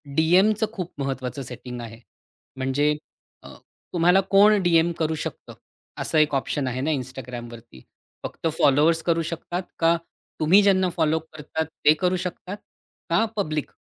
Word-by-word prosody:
डीएमचं 190 Hz, +7 st, +3 dB
खूप 180 Hz, -3 st, -5 dB
महत्त्वाचं 135 Hz, 0 st, -4 dB
सेटिंग 125 Hz, 0 st, -7 dB
आहे. 115 Hz, 0 st, -9 dB, 0.6 s
म्हणजे 135 Hz, +3 st, +1 dB, 0.5 s
अ, -, -, -11 dB, 0.4 s
तुम्हाला 180 Hz, +3 st, +4 dB
कोण 205 Hz, +1 st, +6 dB
डीएम 170 Hz, -1 st, +3 dB
करू 160 Hz, 0 st, 0 dB
शकतं -, -, -8 dB, 0.5 s
असा 155 Hz, -, +1 dB
एक 150 Hz, -2 st, +3 dB
ऑप्शन 135 Hz, 0 st, -1 dB
आहे 130 Hz, +1 st, -3 dB
ना 155 Hz, -, 0 dB
Instagramवरती. 120 Hz, -, -9 dB, 0.4 s
फक्त -, -, -4 dB
फॉलोवर्स 155 Hz, +4 st, +4 dB
करू 165 Hz, -1 st, +1 dB
शकतात? 175 Hz, +2 st, -4 dB, 0.2 s
का 165 Hz, 0 st, +4 dB, 0.4 s
तुम्ही 180 Hz, +7 st, +5 dB
ज्यांना 190 Hz, -2 st, +3 dB
फॉलो 160 Hz, -2 st, +1 dB
करतात 160 Hz, 0 st, -5 dB, 0.2 s
ते 150 Hz, -, +8 dB
करू 185 Hz, 0 st, +1 dB
शकतात? 185 Hz, +2 st, -6 dB, 0.5 s
का 170 Hz, +7 st, +3 dB
पब्लिक 155 Hz, -8 st, -2 dB
160 Hz, 140 wpm, -24 LUFS, 135-180 Hz, 0.6 s, ते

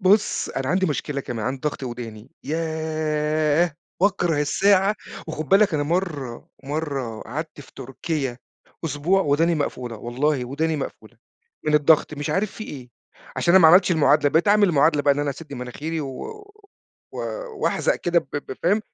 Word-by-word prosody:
بُص 200 Hz, +2 st, +3 dB
أنا 135 Hz, -1 st, -3 dB
عندي 185 Hz, +3 st, +2 dB
مشكلة 145 Hz, -2 st, -2 dB
كمان، 115 Hz, -4 st, -5 dB
عندي 130 Hz, +1 st, -3 dB
ضغط 145 Hz, -, -9 dB
ودَاني، 120 Hz, -2 st, -7 dB
ياه! 155 Hz, 0 st, 0 dB, 0.3 s
باكره 180 Hz, -6 st, +2 dB
الساعة 195 Hz, +6 st, +3 dB, 0.3 s
وخُد 155 Hz, -2 st, -5 dB
بالك 195 Hz, -3 st, +4 dB
أنا 145 Hz, -, +1 dB
مرَّة 150 Hz, -7 st, -3 dB, 0.2 s
مرَّة 140 Hz, -6 st, -3 dB
قعدت 155 Hz, +5 st, -6 dB
في 140 Hz, -, -15 dB
تركيا 135 Hz, 0 st, -4 dB, 0.5 s
أسبوع 165 Hz, +6 st, +1 dB
ودَاني 165 Hz, +3 st, +2 dB
مقفولة، 125 Hz, -6 st, -3 dB
والله 130 Hz, +4 st, -1 dB
ودَاني 155 Hz, +5 st, -1 dB
مقفولة 120 Hz, -4 st, -7 dB, 0.5 s
من 150 Hz, -, +2 dB
الضغط 150 Hz, +1 st, +4 dB
مش 145 Hz, 0 st, -3 dB
عارِف 195 Hz, +1 st, 0 dB
في 215 Hz, -, -7 dB
إيه، 130 Hz, -9 st, -9 dB, 0.5 s
عشان 170 Hz, -, +3 dB
أنا 190 Hz, -, +8 dB
ما 160 Hz, -, +9 dB
عمَلتش 180 Hz, +2 st, +6 dB
المعادلة، 150 Hz, -2 st, +4 dB
بقيت 165 Hz, +5 st, +2 dB
أعمَل 205 Hz, -1 st, +5 dB
المعادلة 150 Hz, -1 st, +3 dB
بقى 140 Hz, -1 st, +4 dB
إن 145 Hz, -, -4 dB
أنا 145 Hz, -1 st, 0 dB
أسدّ 150 Hz, +1 st, -9 dB
مناخيري 145 Hz, +6 st, -4 dB
و 135 Hz, -3 st, -6 dB, 0.9 s
و -, -, -8 dB, 0.4 s
وأحزق -, -, +2 dB
كده 175 Hz, 0 st, +2 dB
ب -, -, -18 dB
ب 145 Hz, -, -5 dB
فاهم؟ 200 Hz, +6 st, +3 dB
150 Hz, 160 wpm, -23 LUFS, 135-170 Hz, 0.9 s, ما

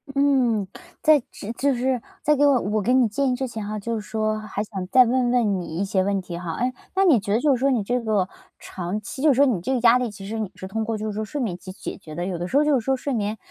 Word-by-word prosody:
嗯， 255 Hz, -8 st, +2 dB, 0.3 s
在 305 Hz, -2 st, +6 dB
只 210 Hz, -, -7 dB
就 275 Hz, +2 st, +1 dB
是 250 Hz, -1 st, 0 dB, 0.2 s
在 300 Hz, 0 st, +4 dB
给 290 Hz, +1 st, +3 dB
我 275 Hz, -3 st, +5 dB
我 210 Hz, +2 st, -1 dB
给 245 Hz, +6 st, +1 dB
你 255 Hz, -3 st, +5 dB
建 270 Hz, +5 st, 0 dB
议 -, -, +1 dB
之 265 Hz, 0 st, -3 dB
前 220 Hz, -3 st, -6 dB
哈， 215 Hz, +1 st, -4 dB
就 230 Hz, +3 st, -3 dB
是 -, -, -6 dB
说 215 Hz, -1 st, -1 dB
还 215 Hz, -1 st, -4 dB
想 190 Hz, -4 st, -6 dB
再 255 Hz, +4 st, +6 dB
问 245 Hz, +1 st, +1 dB
问 215 Hz, -6 st, +2 dB
你 165 Hz, -2 st, -6 dB
一 200 Hz, -, 0 dB
些 190 Hz, -1 st, +1 dB
问 200 Hz, 0 st, 0 dB
题 175 Hz, -1 st, -7 dB
哈。 170 Hz, -2 st, -4 dB
诶， 250 Hz, +1 st, -1 dB, 0.2 s
那 390 Hz, 0 st, +4 dB
你 285 Hz, -, +5 dB
觉 200 Hz, -, -4 dB
得 220 Hz, -, +3 dB
就 285 Hz, -2 st, +3 dB
是 -, -, -5 dB
说 275 Hz, +1 st, +2 dB
你 235 Hz, -6 st, +1 dB
这 245 Hz, +4 st, 0 dB
个 210 Hz, -5 st, +1 dB, 0.3 s
长 185 Hz, +3 st, -5 dB
期 265 Hz, -, -7 dB
就 310 Hz, -, +5 dB
是 265 Hz, -, +4 dB
说 280 Hz, +2 st, +5 dB
你 215 Hz, -10 st, 0 dB
这 265 Hz, -, -2 dB
个 250 Hz, -, +1 dB
压 240 Hz, +1 st, +6 dB
力， 245 Hz, -2 st, -1 dB
其 200 Hz, -1 st, -10 dB
实 220 Hz, +1 st, -4 dB
你 210 Hz, -4 st, -3 dB
是 190 Hz, -, -8 dB
通 220 Hz, +3 st, -2 dB
过 220 Hz, 0 st, -2 dB
就 215 Hz, -, -5 dB
是 215 Hz, -, -3 dB
说 215 Hz, +1 st, -3 dB
睡 285 Hz, +7 st, -5 dB
眠 210 Hz, -9 st, -1 dB
去 185 Hz, -, -9 dB
解 190 Hz, -, -7 dB
决 155 Hz, -6 st, -11 dB
的， 175 Hz, -, -3 dB
有 185 Hz, -2 st, -3 dB
的 175 Hz, -, -3 dB
时 270 Hz, -, +1 dB
候 295 Hz, -, +5 dB
就 300 Hz, -, +3 dB
是 -, -, -8 dB
说 265 Hz, +1 st, +1 dB
睡 280 Hz, +1 st, -3 dB
眠 215 Hz, -1 st, -1 dB
220 Hz, 335 characters per minute, -23 LUFS, 200-260 Hz, 0.3 s, 在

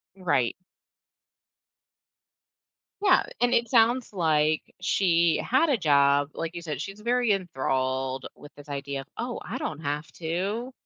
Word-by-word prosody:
You're 190 Hz, -, -16 dB
right. 135 Hz, -8 st, +2 dB, 2.5 s
Yeah, 395 Hz, -, +5 dB, 0.2 s
and 245 Hz, 0 st, +3 dB
it 235 Hz, -1 st, +2 dB
sounds 235 Hz, -1 st, +3 dB
like 155 Hz, -3 st, +1 dB
she 170 Hz, -3 st, +2 dB
had 295 Hz, +6 st, +2 dB
a 270 Hz, -, +3 dB
job. 145 Hz, -3 st, +3 dB
Like 165 Hz, +1 st, -5 dB
you 170 Hz, -, -5 dB
said, 150 Hz, -4 st, -4 dB
she's 195 Hz, +4 st, -7 dB
very 240 Hz, -1 st, +2 dB
enthralled 130 Hz, -6 st, -2 dB
with 145 Hz, -, -14 dB
this 145 Hz, 0 st, -14 dB
idea 140 Hz, -1 st, -4 dB
of, 135 Hz, -, -14 dB
"Oh, 240 Hz, +1 st, -3 dB
I 225 Hz, +8 st, -5 dB
don't 155 Hz, -, -4 dB
have 150 Hz, +1 st, -3 dB
to" 195 Hz, +9 st, -3 dB
165 Hz, 145 wpm, -26 LUFS, 145-220 Hz, 2.5 s, Yeah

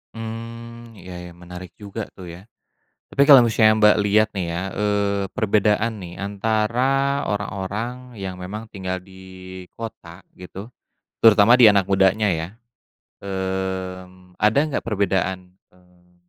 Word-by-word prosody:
Mmm 115 Hz, +1 st, -8 dB
ya 90 Hz, -3 st, -10 dB
ya, 85 Hz, -, -11 dB
menarik 90 Hz, 0 st, -11 dB
juga 105 Hz, +1 st, -7 dB
tuh 90 Hz, -3 st, -9 dB
ya. 90 Hz, +5 st, -13 dB, 0.7 s
Tapi 140 Hz, -, +4 dB
kalau 135 Hz, -4 st, +9 dB
misalnya 110 Hz, -1 st, +4 dB
Mbak 105 Hz, -1 st, +6 dB
lihat 105 Hz, +1 st, +3 dB
nih 95 Hz, -3 st, -2 dB
ya, 85 Hz, +2 st, -3 dB
eee, 100 Hz, -1 st, 0 dB
perbedaan 110 Hz, 0 st, +1 dB
nih 85 Hz, -1 st, -9 dB
antara 115 Hz, +8 st, 0 dB
orang-orang 105 Hz, +5 st, -4 dB
yang 95 Hz, -2 st, -6 dB
memang 105 Hz, +5 st, -6 dB
tinggal 95 Hz, -2 st, -3 dB
di 95 Hz, -1 st, -12 dB
kota 95 Hz, -6 st, -9 dB
gitu, 95 Hz, +5 st, -10 dB, 0.5 s
terutama 110 Hz, +2 st, +7 dB
di 115 Hz, -4 st, +8 dB
anak 100 Hz, -1 st, +2 dB
mudanya 95 Hz, +2 st, +3 dB
ya, 80 Hz, -1 st, -2 dB, 0.7 s
mmm, 95 Hz, -1 st, -5 dB
ada 105 Hz, +5 st, +2 dB
nggak 140 Hz, -, -3 dB
perbedaan, 95 Hz, -3 st, -1 dB, 0.2 s
eee, 90 Hz, -1 st, -27 dB
100 Hz, 130 wpm, -22 LUFS, 95-110 Hz, 0.7 s, kalau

